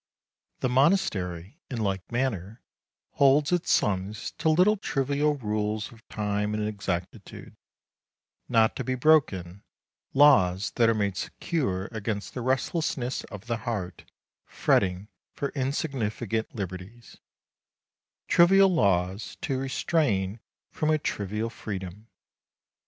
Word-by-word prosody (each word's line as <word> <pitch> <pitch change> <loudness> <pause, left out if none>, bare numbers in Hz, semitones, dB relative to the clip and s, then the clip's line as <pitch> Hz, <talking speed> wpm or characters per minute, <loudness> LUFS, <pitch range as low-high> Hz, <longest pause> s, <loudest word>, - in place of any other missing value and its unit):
The 130 - +1
monastery, 125 - +1
in 125 - -4
like 95 -2 -2
manner, 115 -4 -2 0.5
holds 140 +2 +4
its 175 -1 +1
sons 100 +1 0
to 160 +1 +2
little 180 +7 +4
trivial 145 -4 0
rules 105 -3 -2
of 115 -1 -18
time 105 0 -1
and 105 0 -1
exactitude, 95 -4 -5 0.9
not 110 -1 +3
to - - -2
be 130 - -1
broken, 100 - +2 0.5
laws 105 -10 +5
that 115 -1 +3
are 115 - +2
made 100 -3 -1
secure 95 - -2
against 110 -2 -4
the 125 - -4
restlessness 130 0 -1
of 105 -1 -10
the 115 -1 -1
heart 110 -7 -5 0.4
fretting 95 +1 +1 0.3
for 140 - -2
insignificant 125 -6 -2
liberties 95 +3 -7 1.1
trivial 195 +3 +6
laws 95 - 0
to 130 -1 -1
restrain 130 - 0 0.3
from 155 - -1
a 155 - +4
trivial 105 -4 -3
freedom. 100 -1 -7
110 Hz, 115 wpm, -27 LUFS, 100-135 Hz, 1.1 s, trivial